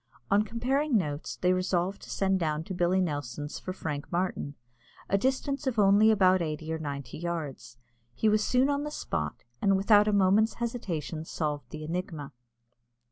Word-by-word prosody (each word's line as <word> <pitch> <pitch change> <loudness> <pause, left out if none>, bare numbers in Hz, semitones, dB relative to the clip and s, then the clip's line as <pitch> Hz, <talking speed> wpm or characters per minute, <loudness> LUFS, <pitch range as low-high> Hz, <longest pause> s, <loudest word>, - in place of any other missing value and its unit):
On 200 +1 +5
comparing 250 +5 +1
notes, 150 -5 -3
they 180 0 +2
resolved 185 +1 0
to - - -12
send 190 -1 +1
down 155 -2 -1
to 190 - -6
Billy 180 +1 +2
Nelson's 145 -4 -3
for 185 - -5
Frank 150 -6 -5
Martin, 175 -5 -2 0.5
a - - +1
distance 270 +5 0
of 250 -3 -1
only 205 +1 +6
about 190 -4 +4
eighty 155 0 -3
or 160 - -3
ninety 140 -2 -5
yards. 150 -9 -5 0.4
He 220 - +1
was 215 0 +3
soon 255 +4 +3
on 285 0 0
the 300 - -3
spot, 75 - -4 0.2
and 195 -1 +4
without 205 +1 +5
a - - +3
moment's 205 +2 +3
hesitation 180 - -3
solved 150 -5 -3
the 155 0 -7
enigma. 160 -3 -4
185 Hz, 170 wpm, -29 LUFS, 155-210 Hz, 0.5 s, only